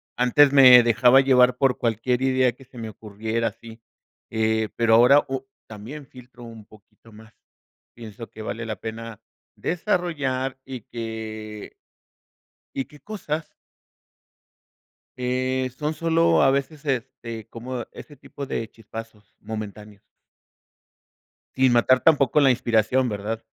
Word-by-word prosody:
antes 135 Hz, +3 st, +4 dB
me 125 Hz, -3 st, +9 dB
dejaba 120 Hz, +3 st, +5 dB
llevar 125 Hz, -2 st, +4 dB
por 135 Hz, -2 st, +2 dB
cualquier 120 Hz, +2 st, 0 dB
idea 130 Hz, -1 st, +2 dB
que 130 Hz, +2 st, -18 dB
se 125 Hz, -1 st, -17 dB
me 110 Hz, -1 st, -6 dB
ocurriera 110 Hz, +2 st, -4 dB
así, 115 Hz, 0 st, -10 dB, 0.5 s
eh, 110 Hz, -1 st, 0 dB
pero 115 Hz, -1 st, +2 dB
ahora 125 Hz, +5 st, +6 dB
o 135 Hz, 0 st, -5 dB, 0.2 s
también 115 Hz, +8 st, -9 dB
filtro 125 Hz, -1 st, -15 dB
un 115 Hz, -2 st, -11 dB
poquito 110 Hz, +1 st, -21 dB
más, 110 Hz, +2 st, -16 dB, 0.6 s
pienso 115 Hz, -1 st, -10 dB
qué 110 Hz, -, -11 dB
vale 115 Hz, +1 st, -5 dB
la 110 Hz, -, -3 dB
pena 115 Hz, 0 st, -7 dB, 0.4 s
desarrollar 145 Hz, -9 st, -2 dB
y 130 Hz, -3 st, -7 dB
que 110 Hz, -2 st, -7 dB, 1.0 s
y 135 Hz, -, -2 dB
que 150 Hz, -, -18 dB
cosas 165 Hz, -7 st, -5 dB, 1.7 s
eh, 130 Hz, +1 st, -1 dB
son 150 Hz, +1 st, -2 dB
solo 165 Hz, +1 st, +2 dB
a 135 Hz, -, +5 dB
veces, 140 Hz, +3 st, -3 dB
este, 115 Hz, -4 st, -4 dB
como 120 Hz, 0 st, -6 dB
ese 145 Hz, -, -12 dB
tipo 140 Hz, +1 st, -9 dB
de 115 Hz, -3 st, -4 dB
chispazos 110 Hz, -2 st, -11 dB
momentáneos. 105 Hz, -1 st, -8 dB, 1.6 s
Sin 130 Hz, -1 st, +4 dB
matar 125 Hz, +2 st, +4 dB
tampoco 145 Hz, -2 st, +3 dB
la 135 Hz, -, +5 dB
inspiración, 120 Hz, +1 st, +1 dB
¿verdad? 110 Hz, +2 st, -4 dB
120 Hz, 130 wpm, -23 LUFS, 110-135 Hz, 1.7 s, me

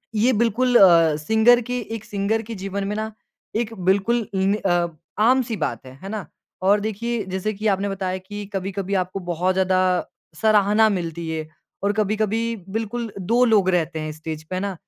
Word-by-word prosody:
ये 225 Hz, +4 st, +3 dB
बिल्कुल 235 Hz, +3 st, +1 dB
अ, 165 Hz, -6 st, +6 dB
सिंगर 220 Hz, +9 st, +4 dB
की 245 Hz, +1 st, -3 dB, 0.2 s
एक 220 Hz, -, -7 dB
सिंगर 205 Hz, +2 st, -1 dB
के 230 Hz, +1 st, -7 dB
जीवन 195 Hz, 0 st, -4 dB
में 205 Hz, -, -2 dB
ना 220 Hz, +1 st, -3 dB, 0.4 s
एक 225 Hz, 0 st, -1 dB, 0.2 s
बिल्कुल 210 Hz, +3 st, +2 dB
इन 190 Hz, +1 st, +2 dB
अ, 175 Hz, -4 st, +1 dB, 0.3 s
आम 250 Hz, +5 st, +5 dB
सी 230 Hz, -1 st, -4 dB
बात 120 Hz, -, -3 dB
है, 130 Hz, -, -11 dB
है 195 Hz, -, -6 dB
ना? 210 Hz, -2 st, -5 dB, 0.3 s
और 200 Hz, +3 st, +4 dB
देखिए, 220 Hz, +2 st, -2 dB
जैसे 190 Hz, +3 st, -2 dB
कि 215 Hz, +2 st, -2 dB
आपने 200 Hz, 0 st, +1 dB
बताया 185 Hz, -1 st, -2 dB
कि 205 Hz, +2 st, -8 dB
कभी-कभी 195 Hz, 0 st, -3 dB
आपको 185 Hz, +2 st, -5 dB
बहुत 175 Hz, +1 st, -1 dB
ज़्यादा 185 Hz, 0 st, +2 dB, 0.6 s
सराहना 210 Hz, +2 st, +4 dB
मिलती 170 Hz, -4 st, -3 dB
है 160 Hz, -1 st, -3 dB, 0.4 s
और 200 Hz, +1 st, +2 dB
कभी-कभी 215 Hz, +2 st, 0 dB
बिल्कुल 225 Hz, +2 st, -3 dB
2 230 Hz, +7 st, +2 dB
लोग 210 Hz, -5 st, +4 dB
रहते 165 Hz, -3 st, 0 dB
हैं 155 Hz, 0 st, -4 dB
स्टेज 155 Hz, 0 st, -7 dB
पे, 170 Hz, +4 st, -6 dB
है 185 Hz, -, -2 dB
ना? 200 Hz, -1 st, -2 dB
200 Hz, 185 wpm, -22 LUFS, 185-220 Hz, 0.6 s, अ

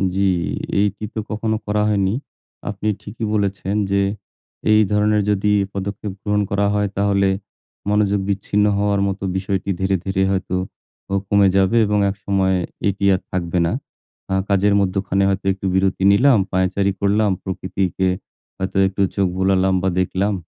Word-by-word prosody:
জি, 100 Hz, -, +1 dB, 0.6 s
এই 105 Hz, -, +4 dB
টিপে 110 Hz, +1 st, -5 dB
কখনো 110 Hz, +1 st, -1 dB
করা 105 Hz, 0 st, +1 dB
হয়নি। 100 Hz, -2 st, +1 dB, 0.6 s
আপনি 105 Hz, +1 st, -4 dB
ঠিকই 110 Hz, +2 st, -6 dB
বলেছেন 100 Hz, -1 st, -1 dB, 0.2 s
যে 100 Hz, 0 st, +3 dB, 0.7 s
এই 105 Hz, 0 st, +6 dB
ধরনের 105 Hz, 0 st, +3 dB
যদি 105 Hz, 0 st, +1 dB, 0.2 s
পদক্ষেপ 100 Hz, +1 st, -4 dB
গ্রহণ 105 Hz, 0 st, +1 dB
করা 100 Hz, 0 st, +1 dB
হয় 105 Hz, 0 st, +1 dB
তাহলে 100 Hz, -1 st, +2 dB, 0.6 s
মনোযোগ 105 Hz, -1 st, +2 dB
বিচ্ছিন্ন 100 Hz, +1 st, +1 dB
হওয়ার 100 Hz, -1 st, +1 dB
মতো 100 Hz, 0 st, -4 dB
বিষয়টি 95 Hz, +1 st, -2 dB
ধীরে, 95 Hz, 0 st, +1 dB
ধীরে 95 Hz, 0 st, 0 dB
হয়তো 95 Hz, -1 st, -1 dB, 0.6 s
ও -, -, -1 dB
কমে 100 Hz, 0 st, +4 dB
যাবে 95 Hz, +4 st, +3 dB
এবং 105 Hz, 0 st, +1 dB
একসময় 95 Hz, -1 st, 0 dB, 0.3 s
এটি 100 Hz, 0 st, -1 dB
আর 90 Hz, -, -4 dB
থাকবে 90 Hz, -1 st, -1 dB
না। 85 Hz, -, 0 dB, 0.6 s
আহ 95 Hz, 0 st, +2 dB
কাজের 100 Hz, +1 st, +3 dB
মধ্যখানে 95 Hz, 0 st, 0 dB
হয়তো 95 Hz, 0 st, -2 dB
একটু 95 Hz, +1 st, -9 dB
বিরতি 95 Hz, 0 st, +1 dB
নিলাম, 125 Hz, +5 st, +5 dB
পায়চারি 95 Hz, +1 st, +1 dB
করলাম, 105 Hz, +1 st, +2 dB
প্রকৃতিকে 95 Hz, 0 st, -2 dB, 0.5 s
হয়তো 95 Hz, +1 st, -3 dB
একটু 95 Hz, +1 st, -3 dB
চোখ 100 Hz, -2 st, +2 dB
বুলালাম 95 Hz, 0 st, +2 dB
বা 95 Hz, -, +2 dB
দেখলাম 95 Hz, +3 st, 0 dB
100 Hz, 150 wpm, -20 LUFS, 95-105 Hz, 0.7 s, এই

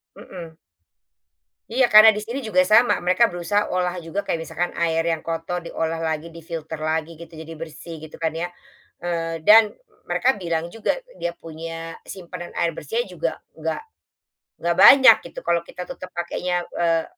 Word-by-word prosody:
Mhm. 165 Hz, -3 st, -10 dB, 1.1 s
Iya 245 Hz, +1 st, +2 dB
karena 215 Hz, 0 st, +9 dB
di 210 Hz, -, -4 dB
sini 240 Hz, +5 st, -4 dB
juga 275 Hz, +2 st, +2 dB
sama 240 Hz, -1 st, +5 dB
mereka 185 Hz, +7 st, +4 dB
berusaha 180 Hz, +3 st, -1 dB
olah 180 Hz, 0 st, -1 dB
juga 175 Hz, +4 st, -4 dB
kayak 165 Hz, -, -2 dB
misalkan 175 Hz, +2 st, -3 dB
air 165 Hz, -1 st, +1 dB
yang 165 Hz, -1 st, 0 dB
kotor 165 Hz, +2 st, -3 dB
diolah 165 Hz, -1 st, -3 dB
lagi 160 Hz, 0 st, -3 dB
di-filter 160 Hz, -1 st, -7 dB
lagi 160 Hz, +1 st, -2 dB
gitu 170 Hz, 0 st, -12 dB
jadi 160 Hz, +1 st, -9 dB
bersih 165 Hz, 0 st, -8 dB
gitu 155 Hz, 0 st, -11 dB
kan 165 Hz, -1 st, -1 dB
ya, 165 Hz, +2 st, -3 dB, 0.5 s
eee, 165 Hz, -1 st, -3 dB
dan, 215 Hz, 0 st, +8 dB, 0.4 s
mereka 265 Hz, +2 st, +2 dB
bilang 170 Hz, -2 st, -2 dB
juga 225 Hz, -, 0 dB, 0.2 s
dia 170 Hz, -, -1 dB
punya 165 Hz, 0 st, -7 dB
simpanan 175 Hz, -2 st, -8 dB
air 170 Hz, -1 st, +1 dB
bersihnya 465 Hz, -, -2 dB
juga -, -, -2 dB, 0.2 s
nggak, -, -, -4 dB, 0.8 s
nggak 170 Hz, 0 st, +1 dB
banyak 260 Hz, -5 st, +9 dB
gitu -, -, -8 dB
kalau 170 Hz, 0 st, +2 dB
kita 180 Hz, -, -7 dB
tetap 185 Hz, -3 st, -8 dB
pakainya, 175 Hz, +1 st, -2 dB
eee, 165 Hz, -1 st, +1 dB
170 Hz, 160 wpm, -23 LUFS, 165-195 Hz, 1.1 s, karena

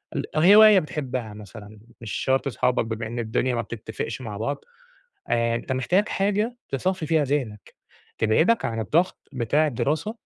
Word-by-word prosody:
ال -, -, -1 dB
هواية 205 Hz, +4 st, +8 dB
بتحبها 130 Hz, -, -4 dB
مثلًا، 105 Hz, +1 st, -12 dB, 0.2 s
مش 115 Hz, -4 st, -7 dB
شرط 135 Hz, +1 st, 0 dB
صحابك، 125 Hz, +1 st, 0 dB
بما 110 Hz, 0 st, -4 dB
إن 120 Hz, +2 st, -5 dB
الدنيا 120 Hz, +2 st, -1 dB
ما 115 Hz, -, 0 dB
بتتفقش 110 Hz, +1 st, -6 dB
مع 105 Hz, -4 st, -6 dB
بعض، 140 Hz, +7 st, -4 dB, 0.6 s
آآ 115 Hz, 0 st, +1 dB
أنت 125 Hz, -, -4 dB
محتاج 180 Hz, +11 st, +1 dB
حاجة 210 Hz, +5 st, 0 dB
تصفّي 180 Hz, +4 st, -2 dB
فيها 155 Hz, -2 st, +2 dB
ذهنك، 130 Hz, -7 st, -3 dB, 0.4 s
تبعدك 160 Hz, -, +2 dB
عن 115 Hz, -1 st, -2 dB
الضغط 165 Hz, -, 0 dB
بتاع 135 Hz, +5 st, +1 dB
الدراسة، 155 Hz, -, -2 dB
130 Hz, 150 wpm, -24 LUFS, 110-160 Hz, 0.6 s, هواية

